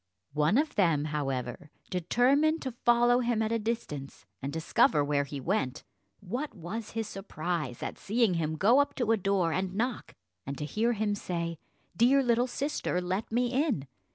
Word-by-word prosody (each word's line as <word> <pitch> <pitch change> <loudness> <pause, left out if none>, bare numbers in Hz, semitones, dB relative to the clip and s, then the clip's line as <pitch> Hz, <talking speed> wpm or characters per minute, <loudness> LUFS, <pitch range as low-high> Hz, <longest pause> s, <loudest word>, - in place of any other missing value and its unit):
One 150 - +3
of 300 +1 +1
them, 165 -7 +2
however, 135 -3 -3 0.2
determined 265 - +2
to 260 - -3
follow 240 +1 +3
him 235 -2 +1
at 220 - -1
a 230 - +1
distance, 210 -12 -4 0.2
and 135 +1 -3
discover 155 -1 +3
where 145 0 +1
he 140 0 -6
went. 135 -5 -1 0.4
What 245 +10 -4
was 210 +5 -6
his 225 -2 -1
surprise 170 - -4
at - - -5
seeing 220 -1 +2
him 160 -2 -1
go 220 - +5
up 285 - +1
to 240 -4 +1
a 225 - +4
door 190 -4 +1
and 185 0 -2
knock, 240 +2 -2 0.3
and 140 0 -5
to 150 - -3
hear 225 +9 +1
him 210 -1 0
say, 170 -4 -3 0.4
"Dear 265 +7 +5
little 240 0 +2
sister, 275 -8 -2
let 185 +5 -3
me 245 +2 +1
in." 260 - +1
200 Hz, 175 wpm, -29 LUFS, 155-240 Hz, 0.4 s, go